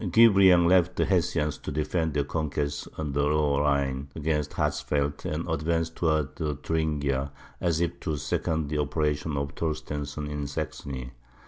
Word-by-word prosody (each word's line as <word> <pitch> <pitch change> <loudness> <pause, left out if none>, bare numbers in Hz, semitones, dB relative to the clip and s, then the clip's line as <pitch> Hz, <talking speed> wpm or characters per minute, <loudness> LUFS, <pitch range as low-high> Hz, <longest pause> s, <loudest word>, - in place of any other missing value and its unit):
Guebriant 95 -3 +6
left 90 0 +4
the - - +2
Hessians 75 -6 +1
to - - -6
defend 80 +1 -1
their 70 - +2
conquests 75 -1 -2
on 75 -2 -3
the 70 +1 +1
Lower 75 -1 +2
Rhine 70 -2 0
against 75 -1 -1
Hatzfeldt, 70 0 -1
and 80 +3 -2
advanced 80 +1 -1
towards 80 -1 0 0.2
Thuringia, 70 -4 0 0.3
as 85 -2 +1
if 85 -1 -1
to 80 -2 -2
second 75 +2 -1
the 75 0 -1
operations 75 0 0
of 70 0 -2
Torstensohn 75 -2 -3
in 75 -1 -3
Saxony. 65 -2 -5
75 Hz, 145 wpm, -27 LUFS, 70-80 Hz, 0.3 s, Guebriant